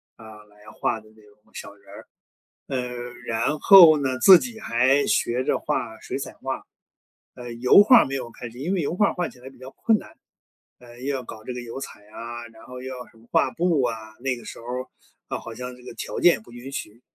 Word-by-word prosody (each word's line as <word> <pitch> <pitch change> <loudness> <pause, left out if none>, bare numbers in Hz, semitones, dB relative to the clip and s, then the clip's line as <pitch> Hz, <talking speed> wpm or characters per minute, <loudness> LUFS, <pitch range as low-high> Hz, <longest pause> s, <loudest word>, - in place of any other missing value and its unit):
啊， 110 -1 -13
来 105 0 -25 0.2
画 110 - -1
的 110 - -20
那 110 - -20
种 105 0 -23
小 - - -8
人 100 -1 -26
儿。 - - -12 0.6
呃， 125 -2 -5
然 120 +7 -1
后 170 -6 +9
呢 130 -2 -1
自 185 +4 +9
己 235 -3 -6
还 130 - +2
学 125 +2 +1
着 - - +1
画 - - -3
水 - - -5
彩 - - -6
画。 - - -5 0.7
呃， 120 -1 -8
油 125 +11 +6
画 245 +3 +8
儿 - - +4
没 135 - -5
有 125 -3 -6
开 120 - -8
始， 120 - -14
因 165 +9 -2
为 185 - 0
油 155 +1 -2
画 205 +1 +4
儿 - - -4
画 175 -1 -2
起 - - -16
来 130 - -10
比 135 - -20
较 130 +1 -10
困 225 -2 +2
难， - - -14 0.6
呃， 120 0 -15
又 140 +2 -1
要 130 - -3
搞 110 -1 -10
这 125 - -5
个 125 - -6
油 120 +2 -7
彩 135 - -9
啊， 120 +2 -8
然 110 0 -17
后 125 0 -9
又 130 0 -6
要 125 - -9
什 - - -24
么 115 +1 -21
画 - - +3
布 170 -4 +1
啊， 110 -2 -4
那 130 0 -1
个 120 - -12
时 - - -9
候， 115 - -13 0.6
啊， - - -3
好 115 - -9
像 125 +2 -7
这 125 - -17
个 - - -8
条 - - -6
件 175 - +6
也 - - -7
不 110 - -18
允 120 +3 -9
许。 110 -3 -7
125 Hz, 260 characters per minute, -24 LUFS, 115-140 Hz, 0.7 s, 后